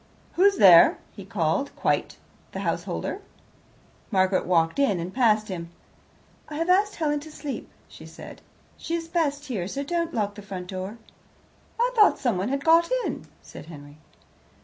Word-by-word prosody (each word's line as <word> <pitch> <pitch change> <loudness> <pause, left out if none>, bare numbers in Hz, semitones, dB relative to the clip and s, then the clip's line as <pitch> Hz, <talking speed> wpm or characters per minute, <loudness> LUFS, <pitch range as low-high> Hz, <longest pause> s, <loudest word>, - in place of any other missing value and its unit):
"Who's 395 +2 +4
there?" 175 -4 +8 0.2
he 200 - -9
called, 185 - -1
quite - - -1 0.4
the - - -4
householder. - - -3 0.9
Margaret 190 -2 +1
walked 165 +5 +2
in 210 -10 +2
and 175 +3 -5
past 220 -4 +2
him. 170 -3 -6 0.8
"I 300 - -7
have 330 +4 +1
asked 410 +3 +2
Helen 295 -2 0
to 310 +2 -11
sleep," 290 -2 -6 0.2
she - - -13
said. - - -12 0.4
"She 335 - -3
is 330 -1 -4
best 295 -4 -1
here; 210 -11 -3
so 275 +7 -4
don't 335 +2 -2
lock 205 -7 -2
the 205 - -10
front 190 -3 -7
door." 190 +4 -6 0.8
"I - - +2
thought 425 -2 +5
someone 220 -4 -1
had 275 +1 -3
got 330 +1 +5 0.2
in," - - -5 0.2
said - - -12
Henry. 145 -2 -12
235 Hz, 160 wpm, -25 LUFS, -, 0.9 s, there